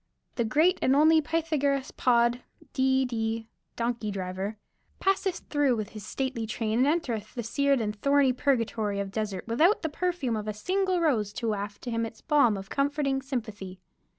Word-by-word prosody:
The 235 - 0
great 315 - +3
and 260 - +3
only 315 +2 +6
Pythagoras 295 -4 0
Pod, 240 0 +2 0.3
D. 265 0 +2
D. 225 -2 -2 0.3
(donkey 235 -2 -2
driver), 190 +2 -4 0.4
passeth 385 -1 0
through 290 -4 +3
with 215 -3 -4
his 215 -2 -9
stately 255 -1 -3
train 225 0 -1
and 260 - +4
entereth 245 -10 -1
the 240 - -3
seared 280 +4 +1
and 210 -2 -2
thorny 280 +3 +3
purgatory 230 -6 0
of 195 -1 -3
the - - -19
desert 210 -3 -3
without 320 - +3
the 320 - 0
perfume 335 -7 -1
of 215 0 -4
a 215 - -3
single 370 - 0
rose 230 -11 +1
to 230 +1 -2
waft 205 -1 -4
to 245 - -4
him 230 0 0
its 225 -1 -6
balm 280 - +3
of 195 0 -8
comforting 275 -1 0
sympathy." 215 -8 -5
245 Hz, 180 wpm, -28 LUFS, 215-285 Hz, 0.4 s, only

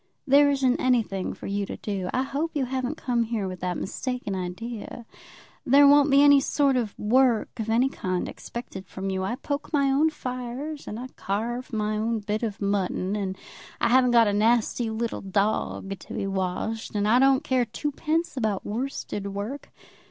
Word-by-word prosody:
"There 285 +2 +6
isn't 270 -3 +2
anything 225 -7 0
for - - -10
you 200 +1 -1
to - - -6
do. 195 -3 -3
I 255 - +1
hope 295 +5 -3
you 275 -3 +1
haven't 260 +3 -3
come 245 -5 0
here 220 -4 -2
with 185 -1 -6
that 180 -1 -2
mistaken 250 -1 -3
idea. 205 +6 -5 0.6
There 280 +2 +6
won't 285 0 +6
be 280 +1 +6
any 285 -1 +7
sort 280 -1 +2
of 230 -5 -2
work 240 +1 +2
of 220 0 -3
any 235 +4 +3
kind 185 -9 -2
expected 195 -6 -8
from 190 0 -4
you. 190 0 -1
I 230 +6 -1
poke 285 +3 -4
my 280 -3 +2
own 295 +4 +4
fires, 255 +2 -5
and 215 - -5
I 250 - -5
carve 235 +6 -3
my 215 -1 -1
own 225 +1 0
bit 210 0 -3
of 220 -4 -3
mutton. 200 -1 -1
And 190 -2 -3 0.4
I - - +2
haven't 250 +1 +5
got 235 -1 +6
a 205 - +1
nasty 225 +2 +2
little 225 +1 -3
dog 195 0 -1
to - - -10
be - - -2
washed. 195 +4 -3
And 205 0 +1
I 235 +4 +5
don't 270 0 +4
care 255 -2 +1
twopence 305 +8 -2
about 215 -6 -1
worsted 215 -3 -4
work. 220 +8 -5
235 Hz, 185 wpm, -26 LUFS, 205-265 Hz, 0.6 s, any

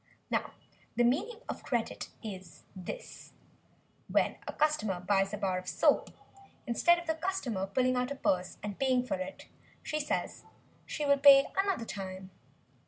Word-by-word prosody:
Now - - 0 0.4
the 240 - +3
meaning 390 - +1
of - - -5
"credit" 235 -3 -2
is 190 -6 -8
this 190 - -8 0.7
when - - +1
a - - -3
customer 220 -12 +1
buys 195 +1 +1
a 210 - -3
bar 190 -2 0
of 185 - -12
soap, - - +3 0.6
instead 345 +9 +4
of 345 - -6
the 320 - +1
customer 310 - -2
pulling 255 +5 +2
out 250 +1 0
a 280 - -3
purse 185 -8 0
and 205 -2 -5
paying 255 -2 +2
for 290 +3 -1
it 280 +1 -6 0.4
she 305 - -2
says 295 - -2 0.4
she 300 - -3
will 280 -1 +4
pay 275 -1 +9
another 390 -11 +1
time. 190 -2 -6
250 Hz, 160 wpm, -31 LUFS, 195-295 Hz, 0.7 s, pay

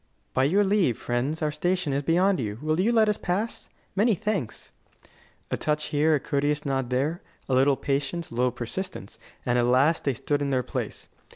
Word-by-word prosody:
"By 130 - +3
your 195 +8 +3
leave, 190 - +2
friends, 135 +7 -2
our 150 - +1
station 175 0 0
is 140 - +1
beyond 180 +5 +2
you. 105 -4 -3
Will 155 +2 +1
you 210 +6 +3
let 220 -2 +4
us 210 - +1
pass? 200 +6 -2 0.3
Many 215 +2 +3
thanks." 205 - -3 0.8
A - - 0
touch 150 0 -1
here, 155 +2 +3
a - - +1
courteous 145 +2 -1
nod 135 -3 -1
there, 140 +7 0 0.3
a 135 - -1
little 135 +1 +4
patience, 145 +5 -2
a - - -9
little 125 +1 +2
persistence, 120 - -6 0.3
and 125 0 +2
at 120 - +2
last 135 +6 +3
they 140 -3 0
stood 145 +5 -1
in 140 - 0
their 130 -2 +1
place. - - -5
150 Hz, 195 wpm, -26 LUFS, 130-180 Hz, 0.8 s, let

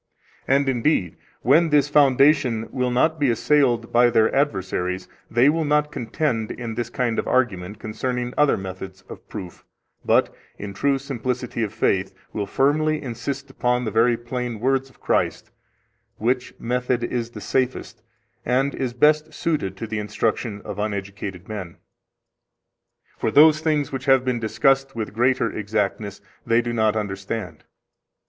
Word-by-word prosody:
And 140 +1 +3
indeed, 120 - +1 0.3
when 165 0 +4
this 150 -1 +4
foundation 140 -4 +4
will 125 -1 0
not 155 +6 +2
be 140 -3 +3
assailed 120 -1 +2
by 120 0 +6
their 110 -2 +3
adversaries, 95 -8 -1 0.2
they 120 +4 +4
will 160 +2 +2
not 150 0 +1
contend 115 -3 -2
in 115 -2 -5
this 120 +1 -3
kind 120 -2 -1
of - - -3
argument 105 -6 0
concerning 125 +3 -3
other 150 -1 +3
methods 95 0 -8
of - - -11
proof, 95 -5 -8 0.4
but, - - +2 0.2
in 100 -1 -6
true 140 +7 +1
simplicity 125 -3 -3
of 110 -3 -1
faith, 95 -3 0 0.2
will 100 -2 -2
firmly 155 +6 +2
insist 135 +2 -5
upon 125 -1 0
the 110 - -2
very 115 +1 +3
plain 120 -1 -4
words 135 +2 +1
of 130 - -24
Christ, - - -1 0.7
which 125 +3 -1
method 125 0 -1
is 120 -1 -2
the - - -9
safest, 130 -1 -2 0.4
and 135 +3 +1
is 125 -2 -3
best 155 +3 +3
suited 145 - -1
to 115 - -4
the 110 -1 -3
instruction 105 0 -2
of 100 - -6
uneducated 100 -3 -4
men; 95 -6 -6 1.4
for - - 0
those 155 +5 +6
things 155 -2 0
which 135 0 -5
have 135 -2 +4
been 125 -2 0
discussed 135 +4 +1
with 110 -2 -4
greater 120 -1 +2
exactness 105 -1 -2 0.2
they 115 +1 +3
do 120 0 -3
not 110 -2 +2
understand. 105 +1 -4
120 Hz, 150 wpm, -23 LUFS, 110-135 Hz, 1.4 s, by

